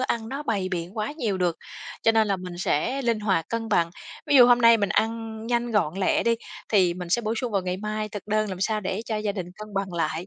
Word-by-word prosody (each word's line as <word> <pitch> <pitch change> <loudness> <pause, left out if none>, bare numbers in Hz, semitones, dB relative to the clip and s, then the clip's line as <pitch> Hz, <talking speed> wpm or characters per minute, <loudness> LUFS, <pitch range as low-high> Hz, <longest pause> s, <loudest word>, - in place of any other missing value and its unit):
ăn 230 -3 -1
nó 275 +4 -4
bày 200 -8 -1
biện 180 +3 -4
quá 215 +6 -2
nhiều 225 -11 -2
được, 175 -2 +1 0.5
cho 225 - +4
nên 220 -1 +3
là 200 - +1
mình 180 -1 -8
sẽ 180 - 0
linh 230 -3 +1
hoạt 190 -6 0
cân 230 -1 -3
bằng. 170 -4 +2 0.4
Ví 290 -1 +4
dụ 245 -2 +9
hôm 245 0 +6
nay 230 -1 +7
mình 205 -2 0
ăn 225 +1 -1
nhanh 240 0 0
gọn 205 -8 +1
lẹ 195 -1 +2
đi 235 - +3 0.3
thì 185 -5 +3
mình 180 -1 -6
sẽ 215 +7 +1
bổ 220 0 -1
sung 245 -3 -3
vào 195 -2 +1
ngày 180 0 -2
mai 215 +1 -3
thực 205 -2 -7
đơn 215 0 +1
làm 185 -2 -6
sao 215 +2 0
để 190 +1 -3
cho 220 - -2
gia 210 -1 -1
đình 185 -4 -5
cân 215 -1 -9
bằng 195 -1 -2
lại, 165 +1 -2
215 Hz, 265 wpm, -25 LUFS, 185-230 Hz, 0.5 s, dụ